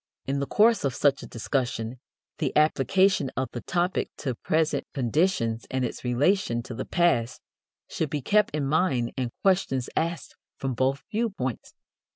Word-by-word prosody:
In 140 Hz, +1 st, -1 dB
the 140 Hz, -, -2 dB
course 225 Hz, -1 st, +4 dB
of 135 Hz, -3 st, 0 dB
such 140 Hz, -2 st, +2 dB
a -, -, -8 dB
discussion 120 Hz, -1 st, -2 dB, 0.4 s
the 150 Hz, -4 st, 0 dB
application 155 Hz, +2 st, +3 dB
of 130 Hz, 0 st, -1 dB
the 120 Hz, -, -5 dB
topic 180 Hz, +1 st, 0 dB
to 130 Hz, -4 st, -2 dB
present 155 Hz, +6 st, 0 dB
conditions 125 Hz, -3 st, 0 dB
and 130 Hz, -1 st, 0 dB
its -, -, -6 dB
relation 125 Hz, 0 st, +1 dB
to 125 Hz, -, -7 dB
the 125 Hz, -, -4 dB
past 150 Hz, -10 st, +1 dB, 0.5 s
should 160 Hz, -, -2 dB
be 150 Hz, -4 st, -3 dB
kept 210 Hz, -3 st, +2 dB
in 150 Hz, -2 st, -1 dB
mind 135 Hz, -5 st, +1 dB
and 125 Hz, -3 st, -2 dB
questions 180 Hz, -10 st, +1 dB
asked 165 Hz, 0 st, -2 dB, 0.2 s
from 135 Hz, -1 st, -2 dB
both 130 Hz, +3 st, 0 dB
viewpoints. 200 Hz, -, -3 dB
140 Hz, 160 wpm, -26 LUFS, 125-175 Hz, 0.5 s, course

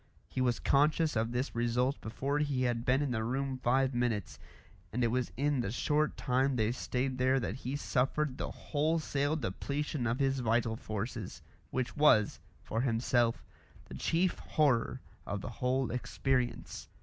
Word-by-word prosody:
He 130 Hz, -, -3 dB
was 125 Hz, -2 st, +2 dB
conscious 150 Hz, +2 st, +3 dB
of 115 Hz, +1 st, 0 dB
this 125 Hz, +2 st, -2 dB
result 120 Hz, +3 st, 0 dB
before 135 Hz, +6 st, -2 dB
he 140 Hz, -4 st, 0 dB
had 120 Hz, -1 st, 0 dB
been 130 Hz, +3 st, +3 dB
in 140 Hz, -, -1 dB
the 110 Hz, -2 st, -1 dB
room 130 Hz, +2 st, -2 dB
five 130 Hz, +2 st, +2 dB
minutes, 120 Hz, -4 st, -1 dB, 0.5 s
and 125 Hz, +3 st, 0 dB
it 115 Hz, -, +3 dB
was 125 Hz, +1 st, -1 dB
in 145 Hz, 0 st, +1 dB
the 105 Hz, -4 st, -1 dB
short 150 Hz, +5 st, +1 dB
time 130 Hz, 0 st, +1 dB
they 110 Hz, -1 st, +2 dB
stayed 130 Hz, +1 st, -2 dB
there 130 Hz, +1 st, +3 dB
that -, -, -2 dB
he 130 Hz, +1 st, -4 dB
suffered 140 Hz, 0 st, 0 dB
the -, -, -2 dB
wholesale 150 Hz, -1 st, 0 dB
depletion 140 Hz, +2 st, -2 dB
of 115 Hz, +2 st, 0 dB
his 135 Hz, -1 st, +1 dB
vital 115 Hz, -1 st, +1 dB
forces, 110 Hz, +1 st, -5 dB, 0.3 s
which 130 Hz, -1 st, -2 dB
was, 145 Hz, -9 st, +4 dB, 0.2 s
for 115 Hz, -, -1 dB
himself, 120 Hz, -1 st, +1 dB, 0.4 s
the -, -, -11 dB
chief 170 Hz, -, +1 dB
horror 130 Hz, -4 st, +1 dB, 0.3 s
of 100 Hz, -1 st, -3 dB
the -, -, -5 dB
whole 125 Hz, +1 st, 0 dB
experience. 125 Hz, 0 st, -1 dB
130 Hz, 160 wpm, -32 LUFS, 120-140 Hz, 0.5 s, was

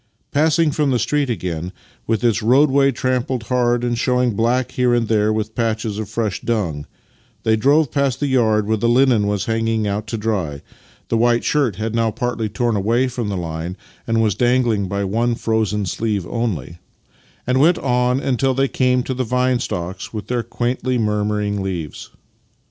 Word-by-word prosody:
Passing 155 Hz, +2 st, +3 dB
from 145 Hz, 0 st, 0 dB
the 130 Hz, -, +2 dB
street 145 Hz, +4 st, 0 dB
again, 90 Hz, -6 st, -3 dB, 0.4 s
\\'ith 110 Hz, -1 st, 0 dB
its 115 Hz, -2 st, +2 dB
roadway 135 Hz, +4 st, +4 dB
trampled 130 Hz, -1 st, -1 dB
hard 120 Hz, 0 st, +1 dB
and 120 Hz, -1 st, 0 dB
showing 125 Hz, 0 st, +1 dB
black 120 Hz, +4 st, 0 dB
here 125 Hz, -2 st, +2 dB
and 120 Hz, -2 st, 0 dB
there 105 Hz, -1 st, +2 dB
with 110 Hz, 0 st, -2 dB
patches 110 Hz, -2 st, -2 dB
of 110 Hz, -3 st, -5 dB
fresh 110 Hz, -4 st, -2 dB
dung, 85 Hz, -11 st, -2 dB, 0.6 s
they 110 Hz, -, +3 dB
drove 140 Hz, +6 st, +3 dB
past 140 Hz, -3 st, 0 dB
the 145 Hz, -, 0 dB
yard 110 Hz, -6 st, +2 dB
where 110 Hz, +1 st, +1 dB
the 115 Hz, +3 st, +1 dB
linen 120 Hz, -4 st, +3 dB
was 100 Hz, -1 st, -1 dB
hanging 115 Hz, -1 st, 0 dB
out 105 Hz, +2 st, -2 dB
to 115 Hz, -, -3 dB
dry 95 Hz, -10 st, -2 dB, 0.5 s
(the 115 Hz, -, +1 dB
white 120 Hz, +1 st, +2 dB
shirt 140 Hz, -9 st, +1 dB
had 110 Hz, +2 st, -3 dB
now 115 Hz, -1 st, +1 dB
partly 115 Hz, -1 st, -2 dB
torn 120 Hz, +2 st, 0 dB
away 115 Hz, +6 st, +1 dB
from 120 Hz, -4 st, -3 dB
the 100 Hz, -, -2 dB
line 85 Hz, +2 st, -5 dB, 0.3 s
and 115 Hz, -1 st, +2 dB
was 105 Hz, -2 st, +2 dB
dangling 120 Hz, -3 st, +1 dB
by 100 Hz, +1 st, -2 dB
one 115 Hz, +5 st, 0 dB
frozen 110 Hz, -3 st, 0 dB
sleeve 105 Hz, 0 st, -2 dB
only), 90 Hz, -, -3 dB, 0.7 s
and 125 Hz, +1 st, +1 dB
went 170 Hz, +5 st, +5 dB
on 125 Hz, 0 st, +1 dB
until 135 Hz, -1 st, 0 dB
they 135 Hz, +1 st, +2 dB
came 125 Hz, -1 st, +1 dB
to 130 Hz, -, -3 dB
the 130 Hz, 0 st, -1 dB
vine 125 Hz, +1 st, +1 dB
stocks 90 Hz, -3 st, -4 dB
with 110 Hz, -2 st, -5 dB
their 120 Hz, -1 st, -1 dB
quaintly 125 Hz, +2 st, -2 dB
murmuring 105 Hz, -2 st, -1 dB
leaves. 90 Hz, -6 st, -5 dB
115 Hz, 180 wpm, -20 LUFS, 105-125 Hz, 0.7 s, went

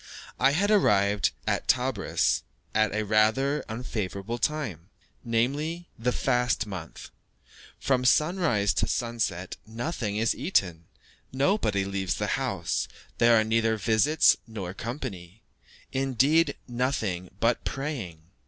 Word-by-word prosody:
I 135 Hz, +2 st, +4 dB
had 200 Hz, +6 st, +2 dB
arrived 105 Hz, -, +3 dB, 0.2 s
at -, -, -1 dB
Tebris -, -, +1 dB, 0.3 s
at 110 Hz, -1 st, +2 dB
a 110 Hz, +1 st, -1 dB
rather 110 Hz, +7 st, +2 dB
unfavourable 110 Hz, -1 st, -4 dB
time 110 Hz, -, -2 dB, 0.3 s
namely, 145 Hz, +9 st, -1 dB
the 125 Hz, +2 st, +1 dB
fast 125 Hz, -2 st, +1 dB
month. 95 Hz, -5 st, -8 dB, 0.7 s
From 130 Hz, -2 st, +1 dB
sunrise 150 Hz, -, +2 dB
to -, -, 0 dB
sunset 115 Hz, -7 st, -2 dB
nothing 115 Hz, -2 st, -3 dB
is 115 Hz, +1 st, +2 dB
eaten, 90 Hz, -, 0 dB, 0.5 s
nobody 130 Hz, -, +1 dB
leaves 95 Hz, -3 st, -2 dB
the -, -, -1 dB
house, -, -, -1 dB, 0.3 s
there 115 Hz, -1 st, +6 dB
are -, -, +3 dB
neither 110 Hz, 0 st, +1 dB
visits 110 Hz, +9 st, +4 dB
nor 100 Hz, -5 st, -6 dB
company 110 Hz, -, -7 dB, 0.5 s
indeed, 135 Hz, +4 st, +2 dB
nothing 115 Hz, -8 st, -2 dB
but 115 Hz, +1 st, +1 dB
praying. 120 Hz, -, -4 dB
115 Hz, 115 wpm, -27 LUFS, 100-135 Hz, 0.7 s, there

